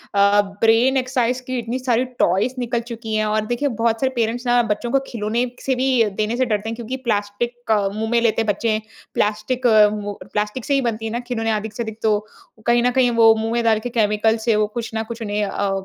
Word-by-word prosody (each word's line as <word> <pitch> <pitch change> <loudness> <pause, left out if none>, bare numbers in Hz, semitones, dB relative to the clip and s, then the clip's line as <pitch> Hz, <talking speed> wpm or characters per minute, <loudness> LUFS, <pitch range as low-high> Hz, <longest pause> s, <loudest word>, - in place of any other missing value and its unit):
अ, 200 +1 +5 0.2
brain exercise 250 +2 +2
की 255 -1 -2
इतनी 235 +3 -3
सारी 250 -1 +1
टॉयज़ 195 +8 +2
निकल 240 -1 -1
चुकी 225 -1 -4
हैं 215 0 +1
और 215 0 0
देखिए 240 +5 -1 0.2
बहुत 225 -1 +2
सारे 265 - +2
पेरेंट्स 235 +1 -1
ना 240 0 +4
बच्चों 235 +3 -2
को 275 - +3
खिलौने 230 +2 -1 0.2
से 265 - +1
भी 260 +2 0 0.3
देने 225 +3 -1
से 255 - +2
डरते 215 -1 -1
हैं 230 - -4
क्योंकि 240 +3 -5
प्लास्टिक, 220 +3 -2 0.2
मुँह 220 +1 -2
में 235 - +4
लेते 225 -1 +2
बच्चे। 215 +1 0 0.3
प्लास्टिक 215 +5 0
अ, 215 -2 +7
वो 205 -1 -5 0.2
प्लास्टिक 210 +4 -2
से 285 - 0
ही 275 - +3
बनती 225 -2 -2
है 220 - -3
ना 240 - -2
खिलौने 225 -2 -1
अधिक 215 0 -3
से 235 - -3
अधिक 220 -1 -7
तो। 215 -2 +3 0.5
कहीं 235 0 +3
न 250 - +3
कहीं 250 -1 +3
वो 225 0 +8
मुँह 220 +1 -2
में 235 0 0
डाल 220 -2 +3
के 245 - -5
केमिकल 210 +1 +2
से 225 - +4
वो 210 0 +2
कुछ 230 +2 -5
न 220 - -1
कुछ 235 0 -7
उन्हें 210 -1 -1
अ, 200 0 -2
225 Hz, 225 wpm, -21 LUFS, 215-245 Hz, 0.5 s, वो